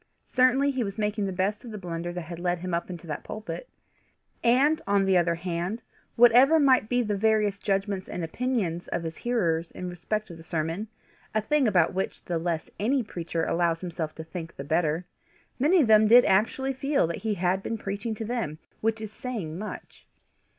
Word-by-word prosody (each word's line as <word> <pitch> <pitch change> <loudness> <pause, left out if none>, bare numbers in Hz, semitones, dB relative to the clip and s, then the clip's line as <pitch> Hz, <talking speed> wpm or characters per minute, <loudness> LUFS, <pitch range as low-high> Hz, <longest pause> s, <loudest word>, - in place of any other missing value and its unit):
Certainly 260 +2 +3
he 260 -3 -1
was 200 -1 -5
making 210 -1 0
the - - -2
best 195 +3 -1
of 240 - -8
the 215 - -6
blunder 175 -2 -4
that 175 0 -5
had 170 +1 -8
led 175 0 0
him 180 +1 -5
up 170 +2 -1
into 175 -2 -7
that 150 -3 -5
pulpit! 215 - -6 0.7
And 270 +6 +4
on 200 -1 +3
the 190 -1 +3
other 170 -1 +3
hand, 175 +5 -3 0.3
whatever 245 +7 +7
might 260 -6 +4
be 245 0 +2
the 210 -2 -1
various 210 -1 +2
judgments 195 -1 -1
and 175 - -4
opinions 180 -3 -2
of 170 - -2
his 160 0 -5
hearers 170 -9 0
in 180 -1 -6
respect 205 +4 -3
of 170 - -9
the - - -11
sermon 165 +5 -2 0.5
a - - +4
thing 280 +4 +2
about 175 -5 +3
which 190 +1 -3
the 170 -2 -1
less 165 -1 -2
any 250 +5 +1
preacher 170 -4 -3
allows 170 -1 +1
himself 170 -3 -4
to 160 - -7
think 165 0 -7
the 140 - -6
better 160 +3 0 0.5
many 325 +7 +5
of 260 - +2
them 215 0 +6
did 240 +3 +8
actually 250 +7 +2
feel 275 - +1
that 170 - -3
he 220 -2 -2
had 185 +1 +1
been 225 - -3
preaching 205 +2 -4
to 220 - -5
them, 220 -10 -3 0.2
which 225 0 0
is 215 -1 -6
saying 215 -10 -5
much. 210 +4 -8
195 Hz, 200 wpm, -27 LUFS, 170-230 Hz, 0.7 s, did